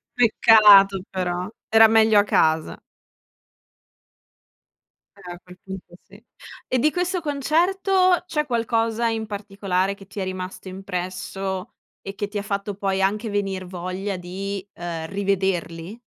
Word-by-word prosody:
Peccato 210 -4 +6
però, 180 -1 -3 0.2
era 225 0 +7
meglio 220 -1 +5
a 205 - +4
casa. 160 -5 +1 2.4
Eh 180 - -10
a 175 - -12
quel 180 0 -15
punto 190 -2 -9
sì. 200 +3 -18 0.4
E 255 - 0
di 305 +6 +3
questo 360 +1 -1
concerto 355 +5 +1
c'è 310 -4 -1
qualcosa 230 -2 0
in 225 -1 -2
particolare 200 -2 -2
che 195 -1 -15
ti 200 - -8
è - - -1
rimasto 185 0 -6
impresso 190 0 -5 0.3
e 195 0 -8
che 205 - -3
ti 205 +1 -6
ha - - -1
fatto 200 0 -3
poi 195 -1 -1
anche 210 +4 0
venir 195 -2 -2
voglia 185 +2 -5
di, 190 +2 -6
ehm, 165 -2 -5
rivederli? 190 -1 -2
200 Hz, 135 wpm, -23 LUFS, 185-225 Hz, 2.4 s, era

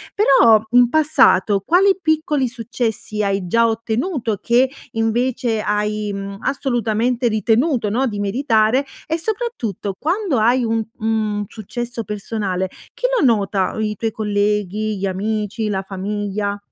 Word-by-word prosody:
Però 250 - +6
in 245 -1 +5
passato 235 -10 +3
quali 385 +3 +4
piccoli 305 -4 +1
successi 230 -3 -3
hai 195 -2 -1
già 230 +5 +3
ottenuto 225 - -2
che 245 +2 +3 0.2
invece 225 0 0
hai, 210 0 -1
mhmm, 195 0 -6
assolutamente 240 -2 0
ritenuto, 225 +2 +1
no, 255 +5 +1
di 205 -3 -4
meritare? 225 +4 +2 0.2
E 320 +1 0
soprattutto 330 - -3
quando 345 - 0
hai 240 +3 +3
un, 225 -1 0
mhmm, 215 -2 -1
successo 235 +3 -6
personale 200 -3 -3 0.2
chi - - -4
lo - - +1
nota? 200 -5 +1
I 215 -1 -1
i - - -12
tuoi 225 +2 -2
colleghi, 210 0 -1
gli 195 - -2
amici, 210 +3 -2
la 195 -2 -1
famiglia? 205 +1 -3
220 Hz, 135 wpm, -19 LUFS, 205-250 Hz, 0.2 s, Però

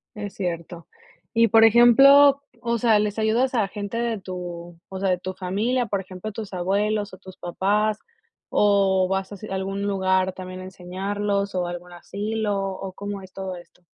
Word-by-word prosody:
Es 205 -1 -6
cierto. 170 -2 -5 0.5
Y 230 0 +5
por 225 0 +6
ejemplo, 275 +5 +7 0.2
o 235 -1 -1
sea, 220 -2 +4
¿les 210 +1 -1
ayudas 235 +4 +1
a 215 -5 +1
gente 205 +2 -5
de 235 -2 -1
tu, 175 -2 -7
o 190 -1 -7
sea, 195 -1 +1
de 180 - +1
tu 185 +1 -6
familia, 215 +7 -1
por 200 -2 -1
ejemplo, 185 +3 -7
tus 210 -1 -7
abuelos 205 +3 0
o 185 - -11
tus 190 -1 -13
papás, 205 +5 0 0.5
o 195 -2 +3
vas 190 0 -2
así 205 +1 -8
a - - -4
algún 195 +1 -3
lugar 190 -2 +1
también 185 0 -8
a - - -8
enseñarlos 200 +2 -3
o 180 -1 0
algún 175 0 -7
asilo, 205 +3 -3
o 195 0 -5
cómo 200 +1 -6
es 190 0 -13
todo 190 -1 -5
esto? 175 +1 -16
195 Hz, 180 wpm, -24 LUFS, 185-215 Hz, 0.5 s, ejemplo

